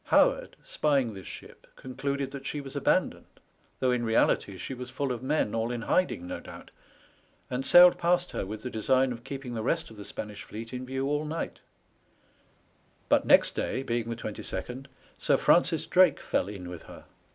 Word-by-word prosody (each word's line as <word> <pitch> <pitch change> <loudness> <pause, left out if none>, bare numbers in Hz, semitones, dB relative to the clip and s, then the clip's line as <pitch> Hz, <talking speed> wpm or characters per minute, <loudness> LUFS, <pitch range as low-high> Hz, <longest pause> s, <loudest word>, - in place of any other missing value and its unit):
Howard, - - +3
spying 135 -7 +1
this 95 -2 -10
ship, - - -11
concluded 140 +1 -3
that 140 -1 -7
she 150 - -3
was 135 -2 -9
abandoned, - - 0 0.4
though 130 -1 +2
in 125 -1 0
reality 110 -3 +2
she 130 - -5
was 125 -1 -7
full 135 +1 -2
of 120 -2 -4
men 130 -5 0
all 115 +1 0
in 120 -2 -4
hiding, 180 - +1
no 90 - -5
doubt, - - -12 0.8
and 125 +1 -1
sailed 180 0 +8
past 175 +1 +1
her - - -3
with 105 +2 -7
the 125 - -3
design 130 +4 +2
of 120 -1 -7
keeping 135 -2 -6
the 115 - -3
rest 160 +6 -1
of 110 - -13
the 105 - -8
Spanish 105 +1 -7
fleet 115 +4 -8
in 125 0 -5
view 135 +1 -2
all 145 +1 0
night; 155 +2 -4 1.5
but - - +3
next - - +6
day, 130 - -2
being 120 -3 -2
the 115 - -2
22nd, 115 +4 -6 0.3
Sir - - +3
Francis - - +3
Drake - - +4
fell - - -1
in 95 -3 -7
with 90 -2 -8
her. - - -12
125 Hz, 185 wpm, -28 LUFS, 110-140 Hz, 1.5 s, sailed